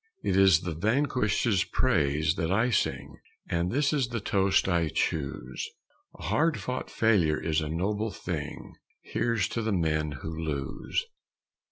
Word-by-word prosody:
It - - +1
is 95 -4 +6
the 85 - -3
vanquished's 110 - +1
praises 75 - +1
that 85 -2 -2
I 115 +5 +2
sing, - - -1 0.3
And 85 +1 0
this 145 +3 +2
is 135 -5 +1
the 120 -1 -3
toast 100 -2 +2
I 85 -3 +2
choose: 70 -5 -2 0.5
"A - - -11
hard 160 0 +1
fought 125 0 -4
failure 95 -9 +3
is 80 -1 0
a 75 - -3
noble 105 +7 -1
thing; 95 - -5 0.3
Here's 115 -5 0
to 115 - -2
the 110 0 -1
men 80 -5 0
who 80 0 -4
lose!" 75 -4 -3
95 Hz, 150 wpm, -28 LUFS, 80-115 Hz, 0.5 s, is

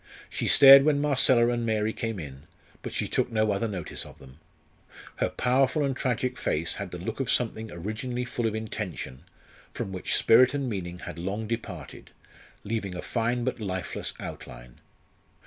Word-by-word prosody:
She - - -2
stared 135 -1 +9
when 145 -1 +3
Marcella 130 -4 +4
and 120 -1 -1
Mary 110 -1 0
came 115 -4 -3
in, 70 -1 -9 0.3
but - - -6
she - - -2
took - - 0
no 110 -1 +2
other 100 +3 0
notice 95 -7 -4
of - - -13
them. 65 +2 -16 0.8
Her - - 0
powerful 135 +3 +1
and 135 -1 -1
tragic 125 0 -2
face 80 +2 -1
had 100 -2 -5
the 90 - -7
look 90 - -5
of 135 -3 -2
something 110 -2 0
originally 110 +8 -4
full 120 -1 -2
of 110 - -2
intention, 105 -11 -5 0.5
from 95 - -4
which 90 -1 -1
spirit 130 +4 +5
and 140 -2 -2
meaning 90 -6 -4
had 90 - -8
long 100 +5 -3
departed, 105 - -6 0.5
leaving 100 -4 -3
a 90 - -4
fine 120 +1 -1
but 130 0 -2
lifeless 95 -4 -3
outline. - - -9
110 Hz, 170 wpm, -27 LUFS, 90-125 Hz, 0.8 s, stared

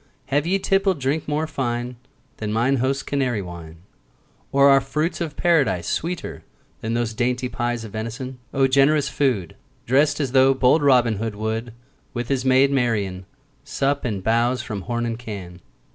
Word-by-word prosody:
Have 145 +3 +2
ye 190 +2 +2
tippled 195 -3 +1
drink 140 +4 -1
more 150 +2 0
fine 125 -4 -3 0.4
Than 105 -1 -3
mine 120 +5 +2
host's 135 +2 0
Canary 125 -7 -1
wine? 85 -2 -10 0.7
Or 140 0 +5
are 135 -1 +6
fruits 150 +7 -2
of 155 -3 -3
Paradise 155 - +2
Sweeter 170 +1 -3 0.4
than 115 +1 -2
those 120 -1 -1
dainty 125 +2 0
pies 120 0 -2
Of 110 - -8
venison? 125 +4 -5
O 135 0 +2
generous 140 +2 +3
food! 120 - -1 0.3
Drest 145 +4 +3
as 140 -4 -1
though 135 0 +5
bold 130 +4 +4
Robin 125 -6 +4
Hood 110 +1 -3
10 105 - -12
Would, 110 +1 -3 0.4
with 120 0 -3
his 135 -2 0
maid 135 +1 +4
Marian, 105 -8 -1 0.4
Sup 140 +1 -1
and 105 -6 -3
bowse 120 +3 +1
from 105 -6 -5
horn 120 0 -1
and 115 0 -3
can. 95 -7 -8
125 Hz, 170 wpm, -22 LUFS, 115-140 Hz, 0.7 s, are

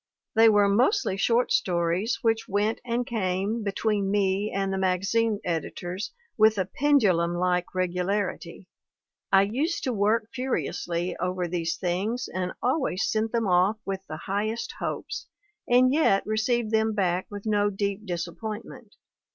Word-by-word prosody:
They 225 0 +6
were 205 -1 +4
mostly 205 - +2
short 235 +5 +2
stories 175 +5 +1
which 225 0 +1
went 205 +3 0
and 245 0 -1
came 205 -1 -1
be 200 - -1
tween 205 -1 0
me 200 +1 +1
and 195 0 -1
the 190 - -1
magazine 200 +4 +1
editors 175 +3 -3 0.3
with 215 0 +5
a 190 - +1
pendulum 190 - +2
like 180 0 0
regularity; 185 0 -2 0.7
I 195 0 +6
used 275 - -1
to 255 - 0
work 215 +1 +1
furiously 180 -9 -2
over 180 0 -2
these 165 -1 -2
things, 195 +7 -2
and 180 -1 -2
always 255 - +1
sent 220 0 0
them 230 -2 0
off 185 +3 +3
with 195 -1 -3
the 155 - -6
highest 215 +6 -3
hopes, 445 - -4 0.4
and 255 +2 +5
yet 280 -10 +3
received 220 +1 0
them 220 0 +2
back 185 -2 0
with 205 0 -8
no 205 -1 +2
deep 200 +1 -2
disap 170 -1 -4
pointment. 220 0 -7
205 Hz, 150 wpm, -26 LUFS, 185-225 Hz, 0.7 s, They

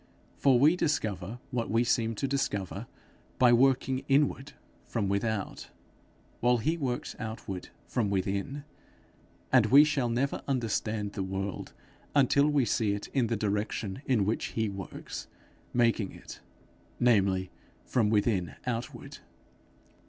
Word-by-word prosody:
For 135 -3 +4
we 150 +7 +5
discover 110 - -1
what 120 -3 -2
we 115 +2 +3
seem 115 -1 +1
to 135 - -1
discover, 105 -9 -2 0.5
by 125 -1 +6
working 130 +1 +3
inward 140 0 +1 0.3
from 110 -4 -2
without, 100 +1 -2 0.7
while 125 +1 +3
he 155 +9 0
works 130 -6 -3
outward 110 -5 -6 0.2
from 115 -5 -1
within; 100 +8 -2 0.9
and - - +6
we 140 +3 +8
shall 145 -5 0
never 125 +4 -1
understand 110 -5 -1
the 100 - -3
world, 95 +1 -4 0.4
until 140 +1 +4
we 145 -4 +2
see 105 -1 +1
it 100 - -5
in 130 -4 +1
the 115 0 -1
direction 105 +1 -2
in 115 -7 +3
which 110 +3 0
he 110 -2 +1
works 95 -1 -7 0.4
making 115 -5 +1
it - - -11 0.6
namely 95 -6 +2 0.3
from 115 -5 +1
within 100 - +1
outward. 120 -1 -5
115 Hz, 130 wpm, -29 LUFS, 100-130 Hz, 0.9 s, we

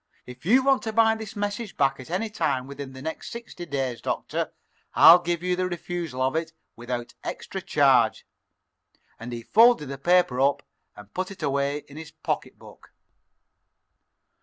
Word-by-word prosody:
"If 125 +5 -11
you 255 +6 +5
want 270 -1 +4
to 220 -3 -4
buy 225 0 +5
this 220 0 -7
message 205 +1 -4
back 135 -2 +2
at 130 - -10
any 185 +6 -1
time 130 -11 -1
within 140 -1 -8
the 130 0 -10
next 160 +1 -5
sixty 235 -7 -8
days, 135 -5 -3
Doctor, - - -3 0.4
I'll 170 +2 +9
give 175 -1 -2
you 180 0 +1
the 185 0 -1
refusal 170 -6 -4
of 130 +3 0
it 160 0 -2 0.2
without 120 0 -5
extra - - -5
charge." - - +3 0.9
And 120 +2 -7
he 120 -1 -6
folded 225 - +5
the 140 -1 -6
paper 175 -5 +3
up 140 +1 +2 0.3
and 105 -1 -14
put 185 0 -3
it 195 - -10
away 140 +1 -1
in 140 - -13
his 160 -1 -8
pocketbook. - - -6
160 Hz, 165 wpm, -25 LUFS, 135-195 Hz, 0.9 s, I'll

